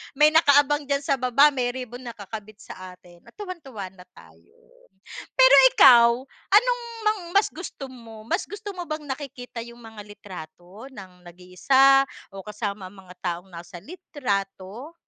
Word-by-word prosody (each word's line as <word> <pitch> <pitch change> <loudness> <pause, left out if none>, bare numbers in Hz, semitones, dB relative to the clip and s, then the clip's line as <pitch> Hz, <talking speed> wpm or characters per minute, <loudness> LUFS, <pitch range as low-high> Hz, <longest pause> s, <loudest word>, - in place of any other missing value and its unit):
may 300 +2 +5
nakaabang 290 -2 +3
diyan 280 0 -1
sa 275 -2 -1
baba. 255 +4 +4
May 255 -3 -2
ribbon 250 -1 -7
nakakabit 215 -1 -10
sa 185 -1 -11
atin 175 -1 -20
at - - -18
tuwang-tuwa 275 - -8
na 185 -1 -17
tayo. 445 - -20 0.8
Pero 260 +1 +6 0.2
ikaw, 235 -3 +7 0.4
anong - - +4 0.3
mang 425 -2 0
mas 400 +1 +4
gusto 310 -5 -9
mo? 230 -4 -13
Mas - - -1
gusto 410 +2 -9
mo 355 - -5
bang 310 -1 -5
nakikita 260 -4 -7
yung 235 0 -14
mga 220 -2 -11
litrato 185 0 -12
ng 185 -4 -13
nag-iisa, 225 +11 +3 0.3
o 195 -1 -10
kasama 210 -2 -5
ang 190 +2 -13
mga 180 -1 -15
taong 175 +1 -4
nasa 175 0 -11
litrato? 240 - -6
235 Hz, 150 wpm, -24 LUFS, 195-285 Hz, 0.8 s, ikaw